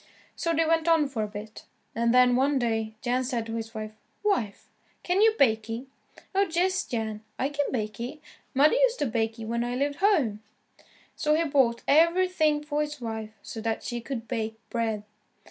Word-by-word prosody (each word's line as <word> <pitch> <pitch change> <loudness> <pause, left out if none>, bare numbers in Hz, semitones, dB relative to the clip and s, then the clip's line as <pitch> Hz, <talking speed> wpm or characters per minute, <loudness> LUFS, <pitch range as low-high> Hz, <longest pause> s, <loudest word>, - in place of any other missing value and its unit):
So 335 - -1
they 330 0 +2
went 325 0 +2
on 325 -3 +4
for 255 -5 -3
a 210 - -1
bit, 210 +1 -9 0.3
and 235 0 +1
then, 250 0 +5
one 275 +3 +2
day, 225 -3 -1
Jan 250 +1 +1
said 240 -3 -2
to 225 - -6
his 225 0 -5
wife, 215 0 -5 0.3
"Wife 315 - -1 0.4
can 360 +3 +2
you 440 0 +5
bake 220 -4 +3
y?" 230 +2 -3 0.5
"Oh, 395 +1 +3
yes, 370 +3 +1
Jan, 220 -3 -3 0.2
I 265 - 0
can 290 -1 -1
bake 215 -4 -3
y. 245 +6 -5 0.4
Mother 290 +3 +5
used - - +3
to - - 0
bake 225 -1 -1
y 225 - -6
when 235 +1 -1
I 245 +1 -2
lived 285 +2 -1
home." 305 - +2 0.7
So 300 0 +2
he 330 - +2
bought 265 -6 +2
everything 325 -1 +3
for 300 0 -1
his 300 -1 -4
wife 220 -2 -5
so 225 - -7
that 225 0 -2
she 240 -1 -4
could 230 -1 -5
bake 220 -2 -2 0.2
bread. 225 -3 -1
250 Hz, 195 wpm, -27 LUFS, 225-305 Hz, 0.7 s, then